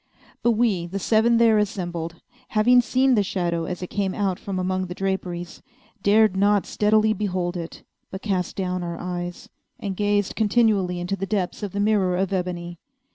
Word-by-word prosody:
But 235 - +3
we, 210 -7 +1
the 190 +3 -4
seven 225 +4 +3
there 225 -2 +5
assembled, 175 -5 -3 0.3
having 245 +3 +4
seen 260 +3 +2
the 215 - +4
shadow 175 -4 -1
as 180 0 -5
it 180 - -7
came 195 -2 -1
out 195 -3 -1
from 195 -2 -4
among 185 0 -1
the 180 - -7
draperies, 180 -3 -3 0.4
dared 210 0 +4
not 205 +1 +3
steadily 215 +1 +2
behold 185 -3 -2
it, 170 -1 -7 0.3
but 190 - -8
cast 185 -4 -1
down 185 -1 -2
our 170 -1 -4
eyes, 175 0 -5 0.3
and 195 -2 -4
gazed 205 0 0
continually 205 -5 +2
into 180 +3 -2
the 195 0 -4
depths 190 -3 -2
of 205 -2 -4
the 200 - -3
mirror 205 -4 +2
of 195 +1 -1
ebony. 175 -2 -3
190 Hz, 180 wpm, -24 LUFS, 180-210 Hz, 0.4 s, there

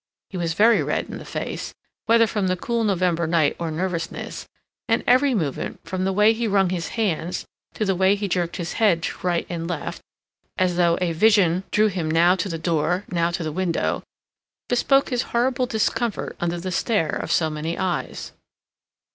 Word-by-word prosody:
He 190 - -5
was 165 -2 -1
very 225 +4 +5
red - - -2
in - - -6
the - - -10
face, - - -5 0.3
whether 230 0 +5
from 210 -3 -1
the 185 0 0
cool 235 +4 -1
November 180 -5 +1
night 160 -3 +2
or 170 -1 -2
nervousness, 170 +1 -4 0.4
and 225 - +2
every 260 +1 +4
movement, 155 -9 -3
from 185 0 -2
the 195 - +1
way 210 +3 +4
he 230 0 -2
wrung 195 -3 +2
his 175 -2 -2
hands 180 -5 -1 0.3
to 215 - -1
the 195 - +2
way 190 +2 +3
he 205 0 -3
jerked 175 -2 -1
his 170 -2 -4
head 175 -7 +3
to - - -3
right 175 -1 +1
and 165 -1 -4
left, 170 -4 -4 0.6
as 180 -1 +1
though 170 -1 +3
a 175 -2 +1
vision 185 -1 +3
drew 215 - +3
him 180 -6 -1
now 170 +3 +4
to 190 +2 -2
the 165 - -3
door, 170 +3 0
now 170 -1 +1
to 170 0 -3
the 155 - -3
window, 175 +1 -1 0.7
bespoke 270 +3 +3
his 245 -3 0 0.2
horrible 250 +1 +1
discomfort 225 0 -1
under 175 0 -1
the 185 +2 -4
stare 190 -1 +1
of - - -4
so 160 -2 +2
many 155 +2 -3
eyes. 185 -2 -3
180 Hz, 190 wpm, -23 LUFS, 170-210 Hz, 0.7 s, very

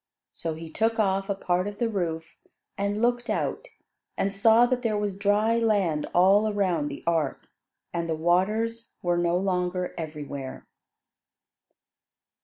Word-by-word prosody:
So 165 -2 -4
he 160 0 -9
took 225 +5 +1
off 195 -2 +1
a 200 - +1
part 180 0 0
of 205 0 -6
the 235 - +1
roof, 165 -6 -3 0.4
and 205 +2 -1
looked 240 0 +1
out, - - -2 0.5
and 195 0 0
saw 225 +4 +5
that 250 0 0
there 220 -3 0
was 205 -2 -2
dry 210 +3 +2
land 195 -9 +1
all 200 +4 +4
around 180 -7 0
the 140 - -7
ark, 165 -2 -1 0.5
and 170 -1 -2
the 160 - +1
waters 215 +8 0
were 175 -1 +1
no 175 0 +2
longer 180 -1 -1
everywhere. 145 -4 -6
195 Hz, 145 wpm, -26 LUFS, 170-215 Hz, 0.5 s, saw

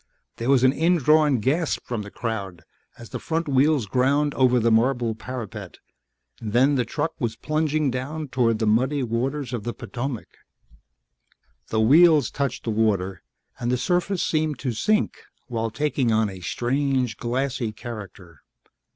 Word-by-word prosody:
There 120 +3 -2
was 135 -2 +4
an 130 0 +5
indrawn 155 -3 +3
gasp 150 +7 0
from 120 -3 -3
the 105 - -8
crowd 100 -7 -5 0.3
as 120 -2 -12
the - - -4
front 165 0 -2
wheels 140 -1 +3
ground 140 +6 +1
over 125 -1 +3
the 115 0 +2
marble 120 0 +2
parapet 110 -5 -7 0.6
then 120 +6 +2
the 125 -3 +1
truck 150 +7 -2
was 115 -2 -1
plunging 155 +2 0
down 140 +4 -4
toward 115 -4 +2
the 110 - -1
muddy 130 +6 +2
waters 125 +3 -2
of 120 - -2
the 120 - -4
Potomac. 120 0 -5 1.4
The 110 - 0
wheels 150 +3 +5
touched 140 -3 -2
the 115 - -2
water 100 -4 0 0.4
and 120 0 -1
the 125 - +2
surface 180 +6 0
seemed 155 -3 0
to 130 -1 -2
sink 210 - 0 0.3
while 115 -2 -2
taking 140 -2 0
on 110 -2 +2
a 95 - -9
strange 130 +3 -1
glassy 125 -1 -2
character. 100 - -10
125 Hz, 150 wpm, -24 LUFS, 115-145 Hz, 1.4 s, an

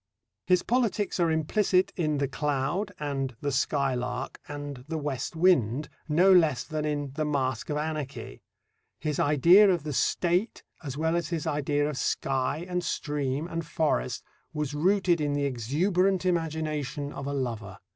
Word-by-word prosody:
His 180 0 +4
politics 230 -5 0
are 170 -1 +3
implicit 180 +4 +2
in 155 -4 0
The 140 0 0
Cloud 150 +8 -1
and 135 -4 -3
The 145 - -1
Skylark 130 -2 -1
and 145 -3 -6
The 160 0 -3
West 145 +1 -3
Wind, 150 - +3 0.2
no 180 +6 +5
less 160 -8 +4
than 155 -1 -3
in 145 -2 -2
The 155 +2 -1
Mask 130 -5 -1
of 150 - -1
Anarchy. 150 -2 -4 0.6
His 150 -2 -2
idea 170 +8 +6
of 175 -5 +1
the 150 -1 -4
State 180 - 0 0.2
as 140 -2 -5
well 160 +2 +1
as 170 -3 -1
his 165 -3 -2
idea 145 0 0
of 150 -3 -4
sky 135 +4 -1
and 180 -1 -2
stream 145 -1 -2
and 165 -1 -3
forest 155 - -1 0.3
was 150 -2 -2
rooted 180 +1 +2
in 145 -1 0
the 145 0 0
exuberant 175 - +1
imagination 155 -4 -2
of 140 - -6
a 140 - -2
lover. 115 -8 -4
150 Hz, 155 wpm, -28 LUFS, 140-170 Hz, 0.6 s, idea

